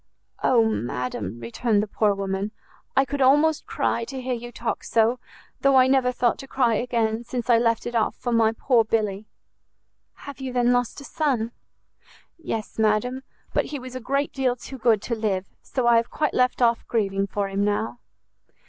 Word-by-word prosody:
"Oh 235 -3 +4
madam," 120 - -3
returned 205 - 0
the - - -4
poor 205 0 +1
woman, 195 +1 -2 0.5
"I 270 - +5
could 280 +1 -3
almost 295 +4 +4
cry 235 - 0
to 265 +2 -6
hear 255 0 -2
you 240 0 -6
talk 235 -1 -3
so, 230 +2 +2 0.4
though 275 -1 +4
I 260 -1 +7
never 260 -1 +3
thought 245 -1 +1
to 270 - -9
cry 250 -3 +2
again, 230 -1 0
since 245 0 -2
I 230 - +6
left 230 -1 +1
it 240 - -4
off 225 -2 +1
for 245 - -4
my 225 -1 +4
poor 230 +1 +2
Billy!" 215 -2 -1 1.0
"Have 280 -1 -8
you, 260 -1 -4
then, 245 0 +3
lost 245 +3 -1
a - - -9
son?" 265 -7 -1 0.9
"Yes, 225 -9 -5
madam; 220 +4 +1 0.3
but - - +2
he 295 - -5
was 255 -1 -9
a - - -3
great 275 +4 -1
deal 260 -2 +1
too 260 +2 -10
good 220 -3 +3
to 240 - -3
live, 205 -4 -1 0.2
so 255 -3 -2
I 235 -1 +6
have 230 - +1
quite 300 -1 -1
left 250 0 +2
off 235 -1 +2
grieving 195 -3 0
for 200 0 -2
him 195 +1 -1
now." 210 +3 -1
235 Hz, 190 wpm, -24 LUFS, 215-255 Hz, 1.0 s, I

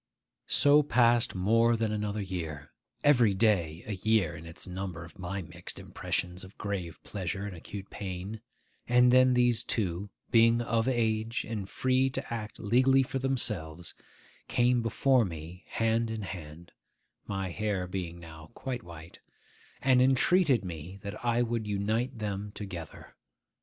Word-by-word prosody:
So 145 +1 +6
passed 120 -5 +3
more 115 +5 +3
than 110 -1 0
another 105 -1 -2
year; 80 -6 -5 0.3
every 120 -8 +5
day 90 -6 +1
a - - -5
year 100 -4 +1
in 85 +1 -10
its 80 - -8
number 90 -2 -5
of 85 +4 -16
my 95 +2 -4
mixed - - -8
impressions 90 +1 -3
of 95 +2 -13
grave 95 -5 -4
pleasure 95 0 -4
and 100 -3 -6
acute 95 +3 -9
pain; 95 +2 -6 0.5
and 125 0 +5
then 130 0 +6
these 120 -1 +3
two, 100 -2 -1 0.2
being 115 0 +5
of 115 0 0
age 115 -2 0
and 105 -4 -4
free 130 +1 +2
to 135 -2 -5
act 110 -2 -5
legally 130 +5 +4
for 135 +1 -3
themselves, 105 -11 -1 0.5
came 120 0 +3
before 125 +2 +3
me 85 -1 -7
hand 115 0 0
in 110 -1 -4
hand 85 -2 -8 0.6
(my 95 -2 -3
hair 100 -1 -1
being 90 -2 -5
now 80 -2 -12
quite 130 -2 -4
white), 85 -3 -12 0.6
and 130 -1 +5
entreated 135 - +4
me 85 +2 -7
that 100 +2 -7
I 120 0 +2
would 115 -2 -2
unite 110 +5 -1
them 105 -1 -4
together. 90 -6 -8
105 Hz, 145 wpm, -29 LUFS, 90-120 Hz, 0.6 s, So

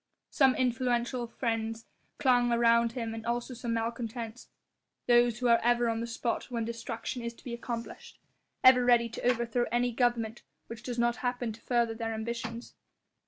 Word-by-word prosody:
Some 265 -2 +4
influential 245 -1 0
friends 225 -1 -3 0.3
clung 245 -4 +3
around 235 0 +4
him 230 -2 -3
and 225 0 -6
also 240 +2 -2
some 235 -1 -3
malcontents, 230 0 -4 0.6
those 240 -1 +4
who 250 0 0
are 235 -1 +5
ever 240 0 +3
on 225 0 -1
the 235 - -3
spot 235 0 -2
when 235 -2 -2
destruction 230 +1 -5
is 235 0 -5
to - - -19
be 245 - -6
accomplished, 235 0 -6 0.4
ever 255 -1 +8
ready 240 -1 +4
to 230 - -7
overthrow 240 0 +1
any 245 +1 +1
government 240 -2 0 0.2
which 230 -1 -9
does 245 0 -5
not 235 0 +1
happen 245 -2 -2
to 225 - -15
further 235 -2 +1
their 225 0 -3
ambitions. 230 +1 -5
235 Hz, 165 wpm, -30 LUFS, 230-245 Hz, 0.6 s, ever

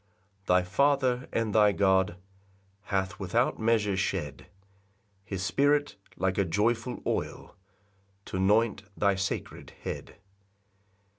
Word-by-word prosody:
5 - - -33
[Thy 90 0 +4
Father 130 +4 +1
and 115 -2 -1
thy 105 -1 +5
God 95 -2 +2 0.7
Hath 95 +1 -2
without 115 +6 0
measure 110 -3 +2
shed 95 - -3 0.8
His 95 -2 -4
Spirit, 145 +6 +2 0.2
like 95 +1 0
a - - +4
joyful 115 +7 -1
oil, - - -3 0.7
T'anoint 100 +3 +2 0.2
thy 100 -1 +3
sacred 95 +1 -4
head. - - -6
105 Hz, 105 wpm, -28 LUFS, 95-115 Hz, 0.8 s, thy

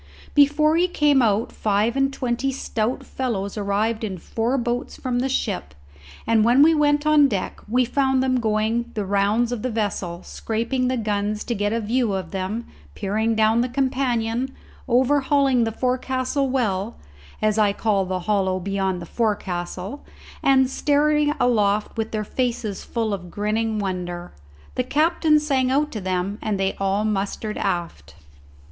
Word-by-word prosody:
Before 300 +2 +4
he 355 +2 +3
came 295 -6 +3
out 220 -1 +1
five 215 +3 0
and 270 0 +2
twenty 255 +1 -1
stout 235 -2 -2
fellows 205 -7 -3
arrived 215 +2 -1
in 195 -4 -3
four 230 +8 -1
boats 240 0 -2
from 250 -2 -2
the 265 +2 0
ship, 195 - -2 0.5
and 225 -1 +3
when 245 +5 +6
we 325 +2 +6
went 295 -1 +2
on 305 -2 +6
deck, 200 -8 -3
we 250 +2 +3
found 265 +1 +1
them 255 -1 +1
going 220 +1 0
the 210 -2 -2
rounds 205 +5 +1
of 245 -3 -3
the 255 - -2
vessel, 200 -6 -3
scraping 235 +3 -2
the 255 0 0
guns 210 -1 -1
to 240 - -2
get 205 -1 -1
a 230 - 0
view 230 0 0
of 190 -1 -4
them, 200 +4 -3 0.3
peering 220 +3 0
down 220 +1 +3
the 250 - -1
companion, 255 -2 0 0.4
overhauling 265 0 +3
the 225 - -1
forecastle 255 +3 -1
well, 225 -4 -1 0.4
as 215 0 +1
I 210 -1 +4
call 200 -1 +1
the 185 0 -3
hollow 190 -1 0
beyond 190 -1 -2
the - - -8
forecastle, 195 - -3 0.4
and 265 -1 +4
staring 295 +2 +2
aloft 210 -4 +1
with 225 -1 -2
their 215 -1 -2
faces 230 -3 -2
full 225 -3 -2
of 180 -3 -6
grinning 215 +3 -1
wonder. 180 -3 -4 0.4
The 250 - 0
captain 305 +3 +3
sang 270 -4 +1
out 295 +3 +1
to 215 - -5
them 185 +3 -2
and 210 -3 -2
they 195 0 +1
all 195 +2 0
mustered 210 +1 -2
aft. 165 - -3
225 Hz, 160 wpm, -23 LUFS, 200-260 Hz, 0.5 s, when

